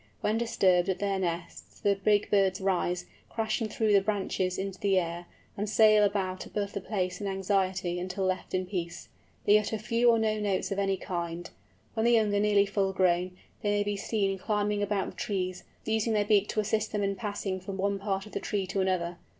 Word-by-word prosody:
When 215 +2 +1
disturbed 190 -6 +2
at 190 - 0
their 200 -1 -1
nests 170 -2 -5
the 200 - +3
big 205 +1 +1
birds 195 -2 +3
rise, 180 -2 0 0.2
crashing 225 0 -1
through 215 0 +1
the 200 - +6
branches 190 -2 -1
into 195 -1 -4
the 195 -2 +2
air, 170 0 -2 0.3
and 205 +1 -3
sail 215 0 +6
about 190 -2 0
above 205 -1 -3
the 200 - -3
place 185 -1 -2
in 200 - -2
anxiety 190 -2 0
until 185 +2 -3
left 185 0 -2
in 185 0 0
peace. 180 -3 -5 0.4
They 210 +1 +6
utter 210 +1 -2
few 235 +2 +2
or 230 - +5
no 215 -1 +1
notes 200 -2 -1
of 195 - -1
any 195 -1 +1
kind. 170 -1 -4 0.5
When 220 - -1
the 240 - +5
young 215 -3 +3
are 200 - +2
nearly 205 -1 +4
full 195 -1 0
grown, 180 -1 +1 0.2
they 205 - 0
may 205 0 +2
be 205 0 -2
seen 195 -1 -1
climbing 210 0 0
about 205 -1 -1
the - - -20
trees, 185 -5 -3 0.2
using 220 +1 +1
their 210 -1 +2
beak 205 -1 +3
to - - -2
assist 215 0 0
them 210 -1 0
in 200 0 0
passing 200 -2 -3
from 190 +1 -6
one 200 +1 0
part 195 -1 -2
of 215 - -12
the - - -3
tree 200 -2 -2
to 195 +1 -1
another. 175 -2 -1
195 Hz, 210 wpm, -29 LUFS, 185-210 Hz, 0.5 s, the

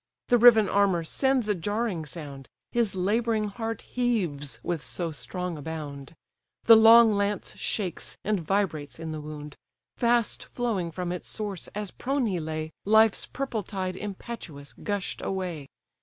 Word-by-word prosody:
The 245 - +5
riven 225 -3 +8
armour 195 -4 +2
sends 265 - +1
a 210 - +3
jarring 205 -2 -2
sound; 140 -4 -8 0.2
His 230 -5 +1
labouring 215 +3 +1
heart 225 +1 -4
heaves 185 - -1
with 170 -4 -2
so 170 -2 -3
strong 155 +5 -4
a - - -7
bound, 145 -2 -7 0.5
The 230 - +9
long 225 0 +8
lance 200 -1 -1
shakes, 190 -5 -3
and 210 -2 +1
vibrates 165 -4 -1
in 165 -1 -5
the 155 -1 -5
wound; 150 -1 -8 0.4
Fast 235 -2 +2
flowing 220 -8 -2
from 175 +1 -4
its 180 - -5
source, 205 -5 -5
as 210 -2 -4
prone 270 0 -1
he 190 -5 0
lay, 155 0 -4
Life's 220 +1 +4
purple 260 -5 -3
tide 185 -1 -4
impetuous 190 -8 -7
gush'd 205 -2 -3
away. 180 -7 -3
195 Hz, 150 wpm, -27 LUFS, 160-220 Hz, 0.5 s, The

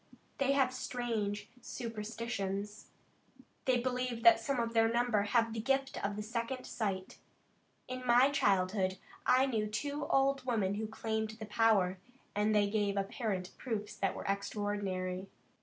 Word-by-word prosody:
They 275 0 +3
have 265 -2 +3
strange 220 -5 -2
superstitions. 210 -3 -4 0.8
They 255 -1 +4
believe 250 -1 -2
that 345 -1 +8
some 275 -3 -1
of 230 0 -1
their 225 0 +4
number 240 -3 +2
have 225 +2 +2
the 225 - -3
gift 270 +3 0
of 205 +1 -2
second 235 +3 -3
sight. 195 -4 -3 0.7
In 255 0 -5
my 250 +3 +5
childhood 190 -5 +2 0.3
I 255 +1 +6
knew 220 -5 0
two 285 +8 -3
old 270 0 +2
women 220 -6 +1
who 215 +2 -2
claimed 220 0 -3
the 215 - -5
power, 210 -4 +3 0.4
and 210 +1 +2
they 205 -1 +4
gave 205 -1 0
apparent 195 -2 -2
proofs 215 -5 -3
that 195 - -1
were - - -6
extraordinary. 195 -2 -2
220 Hz, 140 wpm, -33 LUFS, 205-250 Hz, 0.8 s, that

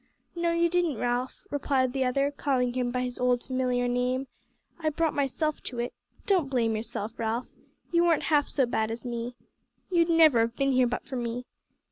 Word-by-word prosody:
"No, 340 0 +1
you 335 0 +3
didn't, 340 -6 +1
Ralph," 245 +2 -2
replied 270 -3 +1
the 265 -1 +1
other, 275 +3 +1
calling 260 -4 0
him 250 -1 0
by 250 +1 -1
his 250 -1 -4
old 250 -1 +2
familiar 250 -1 0
name, 250 +2 0 0.5
"I 315 -2 +1
brought 320 +1 0
myself 290 +2 -1
to 245 - -6
it. 240 +1 -2 0.3
Don't 360 -9 +2
blame 230 -4 +1
yourself, 220 0 -5
Ralph; 230 +2 -2 0.4
you 340 0 +4
weren't 335 -3 +3
half 295 -2 +2
so 270 - +2
bad 220 -2 0
as 230 +3 -6
me. 240 0 -4 0.6
You'd 340 -1 +3
never 320 -7 +6
have 230 +1 +1
been 275 +1 +1
here 255 -1 +4
but 245 - -3
for 260 - -5
me. 240 +1 -3
255 Hz, 190 wpm, -28 LUFS, 245-290 Hz, 0.6 s, never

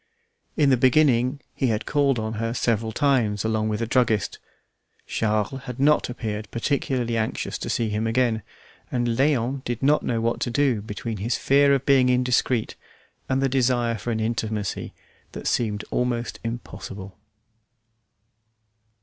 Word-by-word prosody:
In 145 -3 +4
the 130 - +4
beginning 130 0 +3
he 135 - 0
had 110 -2 -1
called 140 -3 +2
on 110 0 -3
her 115 +1 -2
several 115 -2 0
times 115 -7 +1
along 110 -1 0
with 105 +1 -2
the - - +1
druggist. 115 -6 +1 0.7
Charles 110 +4 -1
had 125 -1 -7
not 150 0 +3
appeared 110 -4 -4
particularly 120 -1 -1
anxious 110 -1 -2
to - - -5
see 115 -2 0
him 105 +2 -1
again, 115 -1 +1 0.5
and 120 -1 0
Léon 130 +1 +1
did 120 -1 -4
not 150 +2 +4
know 115 -2 -1
what 115 +1 0
to - - -1
do 130 -3 +1
between 105 +1 -5
his 110 +5 -1
fear 140 +1 +4
of 135 - -3
being 130 -2 +4
indiscreet 125 -2 +1 0.6
and 130 +1 +1
the - - +4
desire 125 -3 +1
for 110 +3 -5
an 110 -1 -1
intimacy 110 -3 -2 0.4
that - - -7
seemed 105 -3 0
almost 120 -1 -1
impossible. 100 -4 -7
120 Hz, 150 wpm, -24 LUFS, 110-130 Hz, 0.7 s, In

